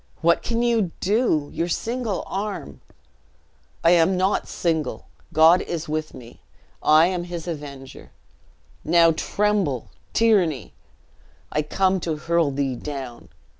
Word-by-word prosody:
"What 170 +1 +3
can 235 0 -1
you 230 -6 +2
do? 195 - +1
Your 170 - -1
single 230 +3 -2
arm 195 - -5 0.5
" - - -37
"I 165 - +5
am 175 +2 +4
not 190 +2 0
single 160 -6 -2 0.3
God 160 +3 +6
is 170 -1 -4
with 155 0 -3
me. 120 -1 -13 0.4
I 155 +2 +6
am 180 -1 -2
his 175 -1 -6
avenger. 140 -5 -8 0.7
Now 165 +1 +5
tremble, 195 - -1 0.2
tyranny! 180 - +2 0.8
I 150 - +1
come 190 +5 +1
to 165 -2 -2
hurl 165 0 +1
thee 135 -2 -2
down!" 130 -3 -7
170 Hz, 130 wpm, -23 LUFS, 150-190 Hz, 0.8 s, God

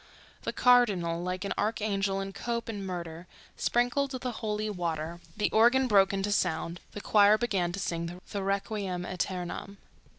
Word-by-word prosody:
The - - -2
cardinal, 200 -10 +3
like 180 +2 -3
an 200 - -1
archangel 200 -2 0
in 195 0 -5
cope 235 +1 -3
and 205 -4 -4
mitre, 170 -1 -6 0.3
sprinkled 245 +4 +1
the 255 -1 -3
holy 215 -2 -2
water; 170 -4 -3 0.2
the 210 - +1
organ 240 +4 +5
broke 195 -4 +5
into 195 +1 -1
sound; 170 -2 0
the 205 - -6
choir 210 0 +5
began 195 -7 0
to 190 - -5
sing 170 -1 -3
the 200 - -2
Requiem 195 -2 -2
Eternam. 185 +2 -4
195 Hz, 155 wpm, -29 LUFS, 180-215 Hz, 0.3 s, organ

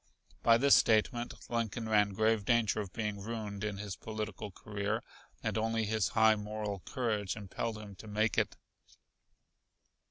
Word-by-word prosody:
By 115 -1 +6
this 140 +3 +5
statement 120 +2 +3
Lincoln 115 -1 -2
ran 105 -2 +3
grave 110 0 +2
danger 110 -1 +2
of 100 -3 -7
being 105 -2 -3
ruined 105 -2 -4
in 105 -2 -2
his 100 -1 -5
political 110 -1 -5
career, 100 +2 -3 0.4
and - - 0
only 115 0 0
his 110 -2 +1
high 110 0 +7
moral 105 -1 -4
courage 110 -7 -1
impelled 105 +2 -4
him 105 -2 -9
to 110 - -11
make 110 +2 +1
it. - - +1
110 Hz, 150 wpm, -33 LUFS, 105-115 Hz, 0.4 s, high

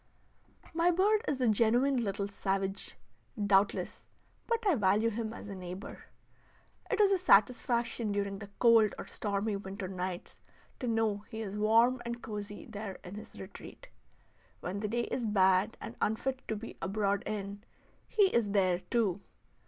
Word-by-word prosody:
My 335 +2 +3
bird 405 +5 +3
is 275 - 0
a 250 - +3
genuine 240 +4 +3
little 200 -1 -2
savage, 195 -1 -2 0.4
doubtless, 200 -1 +2 0.4
but 465 -1 0
I 385 - +5
value 215 -1 +3
him 220 0 -3
as 225 - -9
a 200 - -6
neighbor. 185 +1 -8 0.8
It 440 - 0
is 405 -2 +5
a 385 - +3
satisfaction 235 - +3
during 200 -1 -2
the 200 -1 -9
cold 230 -3 +5
or - - -6
stormy 205 0 -2
winter 195 -1 -6
nights 185 -1 -5 0.4
to 250 - -3
know 225 -2 +1
he 220 0 -5
is 200 -1 -5
warm 230 +4 +4
and 235 0 -4
cosy 205 -1 -6
there 205 -3 -6
in 180 - -9
his 210 +1 -10
retreat. - - -10 0.7
When 185 +3 -4
the 210 - -2
day 240 +3 0
is 240 -2 -2
bad 190 +1 +3
and 230 - -7
unfit 255 +5 -1
to 220 - -1
be 220 +2 -8
abroad 200 0 0
in; 200 -1 -4 0.4
he 425 - +3
is 215 -4 +2
there 185 -3 +3
too. 205 -3 0
215 Hz, 160 wpm, -32 LUFS, 200-235 Hz, 0.8 s, I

